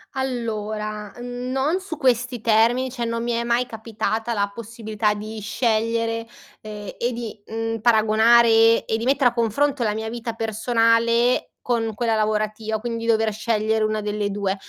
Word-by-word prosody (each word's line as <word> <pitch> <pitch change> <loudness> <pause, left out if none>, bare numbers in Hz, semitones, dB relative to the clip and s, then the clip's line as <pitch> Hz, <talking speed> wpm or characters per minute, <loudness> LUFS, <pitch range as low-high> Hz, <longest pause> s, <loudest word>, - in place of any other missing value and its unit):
Allora, 215 -5 -3
non 255 +7 -1
su 375 -5 -7
questi 250 -3 +1
termini, 230 +4 +2
cioè 240 -1 -4
non 230 0 -2
mi 240 - -1
è 235 0 0
mai 235 +1 +1
capitata 225 0 -3
la 200 -2 -1
possibilità 220 -1 -2
di 215 +1 -7
scegliere, 230 +1 -1 0.3
ehm, 210 -1 -8
e 240 - 0
di, 230 -3 -6
mhmm, 225 0 -3
paragonare, 225 +1 +5
ehm, 225 0 +5
e 220 - 0
di 225 - -4
mettere 265 -1 +3
a - - -16
confronto 250 +4 0
la 210 -2 0
mia 220 0 -3
vita 230 0 -5
personale 230 +2 +2
con 225 -3 -1
quella 230 0 0
lavorativa, 215 0 -1
quindi 230 0 -4
dover 220 -1 +2
scegliere 220 0 0
una 215 0 -1
delle 210 0 -2
2. 200 -1 -1
225 Hz, 160 wpm, -22 LUFS, 215-235 Hz, 0.3 s, paragonare